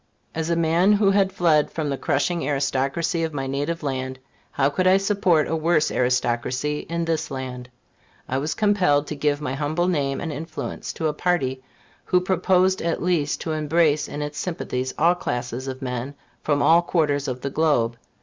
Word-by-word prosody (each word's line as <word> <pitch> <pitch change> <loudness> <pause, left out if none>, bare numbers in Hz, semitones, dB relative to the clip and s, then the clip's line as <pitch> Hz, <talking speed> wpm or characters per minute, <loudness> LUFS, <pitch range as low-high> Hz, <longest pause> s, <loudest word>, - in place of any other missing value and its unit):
As 160 0 -2
a 170 - +2
man 170 +4 +3
who 200 -1 +4
had 195 -1 +3
fled 160 -5 +3
from 150 -3 -3
the - - 0
crushing 165 +6 0
aristocracy 140 +4 0
of 160 -2 -3
my 135 -1 -2
native 145 +5 -2
land, 130 -2 -3 0.3
how 135 - +1
could 185 +6 +1
I 185 +1 +6
support 195 -5 +2
a 165 - -1
worse 160 -1 +2
aristocracy 125 +3 0
in 170 0 -1
this 160 -1 -1
land? 130 -2 -6 0.6
I 130 - -1
was 150 +3 -2
compelled 185 -9 +2
to 150 - -5
give 145 0 0
my 145 -3 -3
humble 155 +5 -1
name 140 -6 0
and 160 -3 -4
influence 160 +2 -5
to 160 - -4
a 150 - -1
party 140 -6 0 0.4
who 180 - +3
proposed, 185 +1 +2
at 165 -1 -1
least, 165 -5 0
to 160 - -3
embrace 155 0 +2
in 150 - -4
its 150 0 -5
sympathies 130 -7 -3
all 170 +3 +4
classes 125 -5 -4
of 130 0 -6
men, 125 +2 -4 0.3
from 145 -1 +1
all 170 +1 +6
quarters 150 -5 0
of 130 -1 -4
the 140 - -3
globe. 135 -7 +1
150 Hz, 185 wpm, -23 LUFS, 135-170 Hz, 0.6 s, I